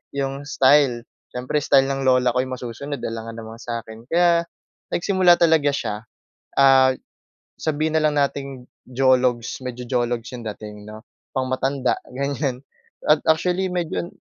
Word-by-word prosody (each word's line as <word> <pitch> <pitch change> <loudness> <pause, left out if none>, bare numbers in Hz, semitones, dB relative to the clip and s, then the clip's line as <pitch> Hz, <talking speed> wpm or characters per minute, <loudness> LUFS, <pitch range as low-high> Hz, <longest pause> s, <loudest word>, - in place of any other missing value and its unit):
yung 135 0 -3
style. 135 -4 +3 0.2
Siyempre 130 +4 -2
style 135 -1 +4
ng 135 0 -2
lola 125 -1 +3
ko 125 - +2
yung 130 0 -5
masusunod, 130 +3 -6
alangan 115 0 -5
naman 110 0 -8
sa 115 -1 -3
akin. 110 0 -12
Kaya 170 0 +3 0.5
nagsimula 180 -1 +3
talaga 160 -4 +4
siya, 110 -5 -3 0.5
ah, 135 -1 +6 0.7
sabihin 155 0 0
na 155 - +1
lang 150 -1 +2
nating 140 -2 -2 0.2
jologs, 125 -2 +1
medyo 125 0 -6
jologs 120 -2 -1
yung 120 - -9
dating 105 0 -8
'no, 110 +2 -10 0.3
pang 130 -1 0
matanda 130 0 0 0.2
ganyan 140 -1 -2 0.4
at 150 0 +5
actually 180 +4 +2
medyo 175 -1 -2
135 Hz, 145 wpm, -22 LUFS, 120-145 Hz, 0.7 s, ah